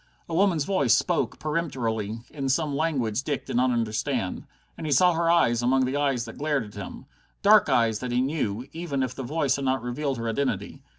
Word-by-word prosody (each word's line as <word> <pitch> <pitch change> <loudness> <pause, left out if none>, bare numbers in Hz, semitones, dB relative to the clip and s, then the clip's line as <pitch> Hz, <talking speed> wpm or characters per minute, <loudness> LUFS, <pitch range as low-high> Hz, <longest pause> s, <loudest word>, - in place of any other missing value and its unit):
A 165 - -6
woman's 175 -3 +3
voice 140 - +3
spoke - - 0
peremptorily, 115 -9 -2
in 135 -3 -3
some 145 +1 0
language 135 -8 0
Dick 140 -1 -3
did - - -5
not 125 +1 +3
understand. 115 -3 -2 0.3
And 160 - -6
he - - -2
saw 180 +4 +5
her 165 0 +1
eyes 120 -9 +3
among 130 +2 +3
the 130 +2 -2
eyes 135 -4 0
that 115 - -10
glared 145 -4 0
at 105 - -13
him. 100 -2 -8 0.4
Dark - - +6
eyes 115 -3 +2
that 125 -1 -4
he 120 - +1
knew, 130 -4 -1
even 160 -5 -2
if 125 -1 -3
the 135 - -6
voice 140 0 0
had 140 - -3
not 130 -2 0
revealed 135 +2 -2
her 115 0 -3
identity. 135 +5 -2
135 Hz, 210 wpm, -26 LUFS, 120-150 Hz, 0.4 s, Dark